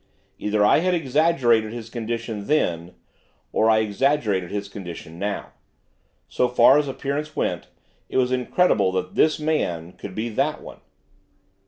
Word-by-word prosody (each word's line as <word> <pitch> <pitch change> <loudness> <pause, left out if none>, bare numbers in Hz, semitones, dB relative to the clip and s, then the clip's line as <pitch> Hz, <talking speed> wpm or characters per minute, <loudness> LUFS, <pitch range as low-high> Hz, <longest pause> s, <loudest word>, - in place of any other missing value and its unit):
Either 105 0 +1
I 105 - +5
had 180 +2 +1
exaggerated 135 -7 +2
his 115 -1 -8
condition 115 -3 -4
then, 85 - 0 0.6
or 110 - +2
I 110 0 +4
exaggerated 105 -4 0
his 100 0 -4
condition 85 -4 -9
now. 100 +1 -3 0.8
So 125 - +1
far 125 +3 +6
as 150 - -1
appearance 145 +3 -4
went, - - -2 0.4
it - - -2
was 125 -1 +2
incredible 125 - +2
that 95 - -2
this 155 0 +3
man 90 - -1
could 95 0 -10
be 115 +2 -2
that 110 - -1
one. - - -11
115 Hz, 145 wpm, -23 LUFS, 100-140 Hz, 0.8 s, far